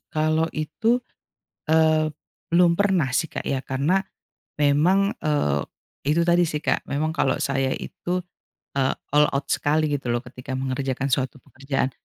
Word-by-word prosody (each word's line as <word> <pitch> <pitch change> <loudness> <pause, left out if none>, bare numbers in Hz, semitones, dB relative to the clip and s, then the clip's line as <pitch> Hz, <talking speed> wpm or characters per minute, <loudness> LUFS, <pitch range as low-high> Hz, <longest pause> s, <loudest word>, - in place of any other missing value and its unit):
kalau 155 +1 +2
itu, 225 +11 0 0.7
eee, 155 -1 +4 0.4
belum 170 0 +5
pernah 190 -9 +2
sih 160 - +2
Kak - - -5
ya 135 -1 -1
karena 150 +9 +1 0.6
memang, 170 +8 +3
eee, 145 - +1 0.4
itu 150 +4 +2
tadi 175 0 +4
sih 150 - -2
Kak - - +1
memang 155 +3 -1
kalau - - +1
saya 135 -1 0
itu, 180 +1 -4 0.6
eee, 135 -1 +2 0.2
all 150 0 +5
out 140 0 -1
sekali 155 +1 +1
gitu 140 -3 -2
loh 120 +1 0
ketika 125 +1 -7
mengerjakan 135 0 -2
suatu 130 +1 0
pekerjaan. 135 -1 -2
150 Hz, 145 wpm, -24 LUFS, 135-160 Hz, 0.7 s, belum